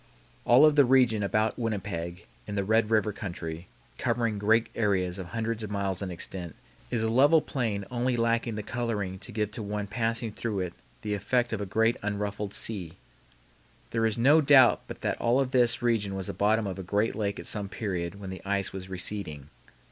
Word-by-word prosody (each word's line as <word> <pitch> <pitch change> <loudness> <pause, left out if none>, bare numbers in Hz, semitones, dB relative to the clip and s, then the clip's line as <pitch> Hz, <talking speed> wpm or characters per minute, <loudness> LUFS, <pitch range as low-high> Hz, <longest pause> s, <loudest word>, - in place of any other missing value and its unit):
All 130 +5 +7
of 155 -1 +5
the 145 - +7
region 125 -4 +4
about 105 +3 0
Winnipeg, 90 -6 -3 0.2
in 105 - -4
the 100 - 0
Red 110 +2 +2
River 110 -1 +2
country, 85 -4 -6 0.3
covering 115 -4 0
great 110 +3 +3
areas 95 -4 0
of 90 - -6
hundreds 115 +1 -3
of 105 - -5
miles 100 -2 -2
in 95 - -3
extent, 85 -1 -6 0.3
is 115 -2 -1
a - - +1
level 140 +8 +5
plain 110 -9 -2
only 125 0 0
lacking 115 0 +1
the 105 - -4
coloring 105 -6 -3
to 100 +5 -8
give 105 -1 -1
to 115 - -5
one 105 0 -3
passing 115 +2 -2
through 105 -2 -3
it 90 -1 -4 0.3
the 105 -1 -2
effect 120 +4 0
of 105 - -2
a 100 - -3
great 110 +4 +2
unruffled 105 0 -3
sea. 95 -6 -3 0.9
There 115 -1 +2
is 110 - -2
no 145 +7 +5
doubt 135 -4 +6
but - - -8
that - - -2
all 120 +3 +3
of 135 -2 0
this 120 -1 +3
region 105 -5 +1
was 95 -1 -3
the - - -4
bottom 110 +2 +2
of 95 -1 -4
a - - -3
great 105 +4 0
lake 100 -2 -2
at - - -7
some 100 -2 -1
period 95 -3 -4
when 95 -2 -6
the 95 - -8
ice 100 0 -1
was 95 -1 -7
receding. 90 -6 -5
105 Hz, 200 wpm, -28 LUFS, 95-115 Hz, 0.9 s, All